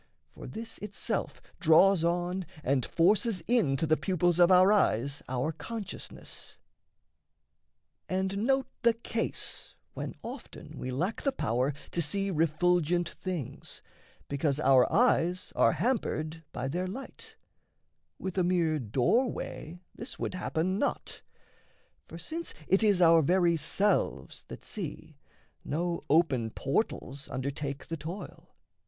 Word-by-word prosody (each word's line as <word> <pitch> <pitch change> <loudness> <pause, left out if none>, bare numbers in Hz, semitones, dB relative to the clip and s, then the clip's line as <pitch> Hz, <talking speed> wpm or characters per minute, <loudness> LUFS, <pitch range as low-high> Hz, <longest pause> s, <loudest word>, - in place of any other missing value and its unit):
For - - -10
this 225 +1 -7
itself 205 -1 -3 0.2
draws 170 +3 +5
on 175 +2 0 0.2
And 130 -1 +1
forces 195 +3 +2
into 165 - +2
the 155 0 +3
pupils 175 +1 +1
of 175 0 +7
our 185 +3 +7
eyes 140 - +1
Our 130 +4 0
consciousness. 210 +5 -7 1.5
And 190 +1 -1
note 265 +4 +2 0.2
the 235 -2 +4
case 230 0 -3 0.2
when - - -5
often - - -9
We 130 - -4
lack 170 - -2
the 275 - +1
power 125 - 0 0.2
to 170 - 0
see 195 +6 0
refulgent 175 +1 +2
things, 180 -9 -6 0.4
Because 140 0 0
our 130 -3 +5
eyes 185 -6 +2
are - - +4
hampered 165 -10 -1
by 125 +1 -3
their 180 +7 -2
light 445 - -8 0.8
With 190 0 -3
a - - +3
mere 170 -3 +2
doorway 140 - -1
this 235 +3 -9
would - - -3
happen 185 +1 -1
not; 285 - -2 0.9
For, - - -9
since 335 +1 -4
it 190 +3 +4
is 205 -5 +4
our 165 -1 +7
very 175 +2 +3
selves 195 +7 0
that - - -10
see, 160 - -6 0.4
No 170 +3 -2
open 140 -8 +3
portals 140 - -2
undertake 140 +1 -4
the 165 - -4
toil. 170 +7 -8
175 Hz, 125 wpm, -30 LUFS, 150-195 Hz, 1.5 s, of